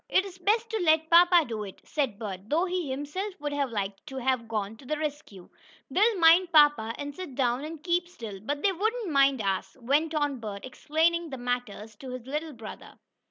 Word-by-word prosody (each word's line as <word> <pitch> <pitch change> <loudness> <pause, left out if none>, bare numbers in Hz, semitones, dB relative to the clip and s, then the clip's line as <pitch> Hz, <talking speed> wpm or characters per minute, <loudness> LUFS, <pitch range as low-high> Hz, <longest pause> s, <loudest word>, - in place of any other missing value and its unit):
"It's 380 -1 0
best 435 +5 +2
to 445 - -1
let 320 -2 +2
papa 345 -1 +7
do 220 -2 -4
it," 195 -2 -9
said 270 -9 -2
Bert, 200 -2 -7
though 330 +5 +2
he 360 -5 -2
himself 300 +9 -4
would 295 0 -3
have 280 -2 0
liked 200 -3 -4
to 265 - -7
have 255 -2 0
gone 215 -1 -3
to 270 - -16
the 305 - -1
rescue. 295 - -6 0.4
"They'll 430 +2 +3
mind 340 +1 +6
papa, 295 -8 +5
and 285 0 -5
sit 360 -8 -7
down 250 0 +1
and 310 0 -7
keep 350 0 +1
still, 225 - -8
but 290 +7 -3
they 400 - +4
wouldn't 435 +1 -1
mind 275 -4 +3
us," 195 -1 -2
went 295 +6 +1
on 290 -3 0
Bert, 205 -3 -6
explaining 325 +5 0
matters 245 -3 -4
to 265 - -9
his 255 -2 -7
little 300 +3 -4
brother. 225 -3 -10
290 Hz, 200 wpm, -28 LUFS, 235-340 Hz, 0.4 s, papa